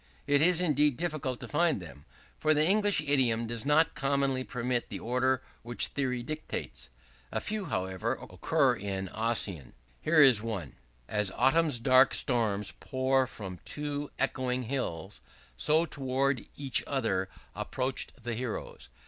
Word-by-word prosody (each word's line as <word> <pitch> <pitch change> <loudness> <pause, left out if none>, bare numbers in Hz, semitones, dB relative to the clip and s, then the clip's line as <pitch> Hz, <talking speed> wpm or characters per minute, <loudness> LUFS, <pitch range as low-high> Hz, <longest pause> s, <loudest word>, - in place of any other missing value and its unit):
It 145 0 +3
is 175 +1 +4
indeed 150 -5 +2
difficult 155 -7 -2
to - - -6
find 165 -4 +2
them; 80 -5 -12 0.3
for 155 0 +3
the 150 +1 +3
English 205 -3 +3
idiom 130 -6 +2
does 115 +3 -4
not 155 +2 +4
commonly 140 -2 0
permit 125 -1 -2
the - - -5
order 130 +2 0 0.2
which 120 +1 +1
theory 125 -3 -2
dictates. 135 - -6 0.4
A - - -1
few, 210 -2 -3
however, 95 - -2
occur - - 0
in 95 -1 -4
Ossian. 100 - -1 0.3
Here 155 - +3
is 130 -7 +7
one: 100 - -4 0.3
"As 105 -2 0
autumn's 135 +4 +2
dark 130 +2 +5
storms 105 -5 0
pour 130 0 +1
from 95 -7 -8
two 145 -1 -3
echoing 130 -1 -1
hills, 105 -7 -4 0.3
so 155 - +3
towards 135 -3 -1
each 135 -4 +2
other 95 -9 -1 0.2
approached 130 -1 -3
the 120 0 -3
heroes. 115 - -5
130 Hz, 140 wpm, -30 LUFS, 110-145 Hz, 0.4 s, is